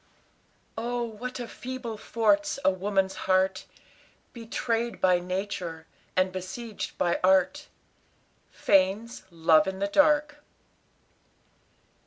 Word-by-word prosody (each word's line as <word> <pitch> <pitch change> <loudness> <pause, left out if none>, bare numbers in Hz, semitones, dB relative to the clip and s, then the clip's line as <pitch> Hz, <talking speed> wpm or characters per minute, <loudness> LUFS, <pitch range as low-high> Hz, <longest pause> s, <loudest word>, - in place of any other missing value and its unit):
Oh, 240 +1 -2
what 235 +3 -6
a 240 - -5
feeble 250 -2 -6
fort's 285 +9 +1
a 190 - +6
woman's 190 0 0 0.2
heart, 190 0 +2 0.7
Betrayed 235 0 -2
by 180 -1 +4
nature, 180 -3 -4 0.3
and 185 0 +2
besieged 190 +4 -6
by 170 -1 +1
art. 190 +11 +3 0.8
FANE'S 200 +4 +1
"LOVE 165 +2 +4
IN 190 0 -3
THE 200 - 0
DARK." 295 +6 +2
205 Hz, 100 wpm, -27 LUFS, 185-240 Hz, 0.8 s, a